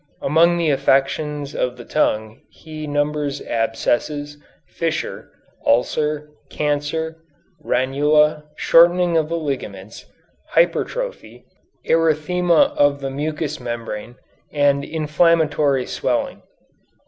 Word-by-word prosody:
Among 170 +4 +3
the 165 -3 +1
affections 140 +1 0
of 125 0 -2
the 120 - -10
tongue 110 -7 -1
he 155 -1 -9
numbers 145 0 -1
abscess, 120 +6 -1 0.3
fissure, 165 -1 -4 0.3
ulcer, 150 +5 0 0.2
cancer, 150 +2 -2 0.5
ranula, 150 +4 +2
shortening 175 +2 +4
of 160 -1 +1
the 170 - -1
ligaments, 110 - -6 0.5
hypertrophy, - - -1 0.4
erythema 165 +1 +2
of 145 0 +3
the 135 -1 -4
mucous 150 +2 -3
membrane, 120 -1 -6 0.4
and 140 -1 +2
inflammatory 150 -3 +1
swelling. - - -2
150 Hz, 90 wpm, -20 LUFS, 135-160 Hz, 0.5 s, shortening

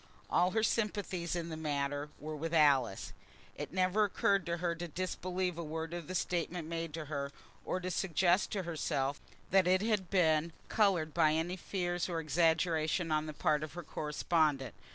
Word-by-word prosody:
All 180 - +4
her 220 +3 0
sympathies 205 -6 -1
in 170 -1 -3
the 160 - -4
matter 145 -1 -2
were 155 +1 -6
with 165 +3 -3
Alice. 135 -9 +3 0.4
It - - -6
never 185 +3 +2
occurred 200 -2 +1
to 170 0 -1
her 170 0 0
to 170 +1 -5
disbelieve 180 +1 -2
a - - -2
word 160 +1 -4
of 175 -3 -5
the 185 - -4
statement 175 -2 -1
made 165 -1 -3
to 160 -2 -5
her, 140 -1 -3 0.3
or 185 - -1
to 185 0 -3
suggest 180 +1 +2
to 195 -3 -1
herself 150 -4 -1 0.3
that 190 -2 +5
it 185 +1 +4
had 210 -5 0
been 165 -3 +3 0.2
coloured 180 -8 +2
by 155 -2 +4
any 165 +3 0
fears 175 -1 -2
or 170 -2 -1
exaggerations 160 +1 +1
on 155 0 +1
the - - -3
part 150 -1 +1
of 155 -1 -5
her 175 +1 -6
correspondent. 150 -3 0
170 Hz, 180 wpm, -33 LUFS, 155-180 Hz, 0.4 s, that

